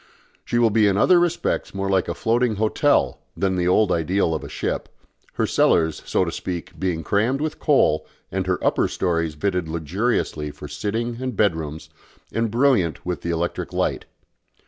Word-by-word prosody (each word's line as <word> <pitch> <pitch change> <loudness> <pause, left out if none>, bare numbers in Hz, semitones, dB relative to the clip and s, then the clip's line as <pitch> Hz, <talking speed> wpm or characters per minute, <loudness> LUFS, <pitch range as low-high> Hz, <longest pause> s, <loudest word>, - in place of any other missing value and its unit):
She 120 - -1
will 115 -2 +4
be 105 -1 +4
in 100 -1 +2
other 175 - +5
respects 175 - -1
more 100 0 -2
like 95 -1 +1
a - - -3
floating 115 0 +1
hotel 110 +1 +2 0.2
than 95 +1 +1
the 90 -1 0
old 95 +2 +3
ideal 85 +1 +1
of 80 - -3
a - - -7
ship, - - -3 0.4
her - - 0
cellars, 80 -1 +2
so - - +2
to - - -3
speak, 90 -2 -6
being 85 -4 -1
crammed 110 - +1
with 155 +1 -3
coal 135 - +3 0.2
and 95 -1 -2
her 90 -1 +1
upper - - +2
stories 85 -4 -1
fitted 90 0 -1
luxuriously 85 -1 -1
for 75 - -9
sitting 115 - -3
and 130 -5 -3
bed 100 -6 +3
rooms 80 -1 -7 0.4
and 115 0 0
brilliant 115 - +2
with 90 0 -3
the 85 - -4
electric 85 +1 -2
light. - - -1
95 Hz, 180 wpm, -23 LUFS, 85-115 Hz, 0.4 s, other